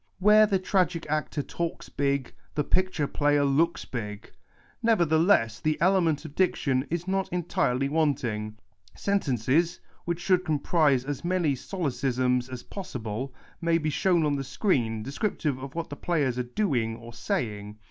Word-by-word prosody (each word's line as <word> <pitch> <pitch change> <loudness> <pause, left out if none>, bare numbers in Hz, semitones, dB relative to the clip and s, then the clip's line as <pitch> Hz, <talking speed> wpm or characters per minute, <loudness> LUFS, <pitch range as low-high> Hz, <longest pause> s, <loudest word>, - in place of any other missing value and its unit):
Where 210 +2 +6
the 200 -2 +2
tragic 180 -2 0
actor 155 -1 -1
talks 170 +3 -4
big, 140 -2 -1 0.2
the 150 - +1
pic 185 +5 +1
ture 155 -5 -1
player 145 0 +2
looks 160 +5 +1
big. 105 -4 -6 0.5
Nevertheless, 170 - +3
the 155 0 0
element 170 -4 +2
of 150 - -8
diction 140 -7 +1
is 170 +2 -3
not 195 0 0
entirely 140 -7 0
wanting. 120 -9 -1 0.4
Sentences 160 - +1 0.3
(wiiieh 170 -1 0
should 185 +1 +2
comprise 150 -4 +2
as 145 -1 -4
many 175 -4 +1
solecisms 130 -5 -1
as 125 -2 -6
possible) 130 - -5 0.3
may 165 0 +3
be 155 -2 -1
shown 170 +1 +2
on 145 -1 +1
the 135 - -3
screen, 125 - 0
descriptive 140 - -2
of 135 +2 -8
what 165 -2 -4
the - - -4
players 145 -7 0
are - - +2
doing 120 - -1
or 115 0 -11
saying. 105 -3 -3
145 Hz, 150 wpm, -27 LUFS, 125-175 Hz, 0.5 s, Where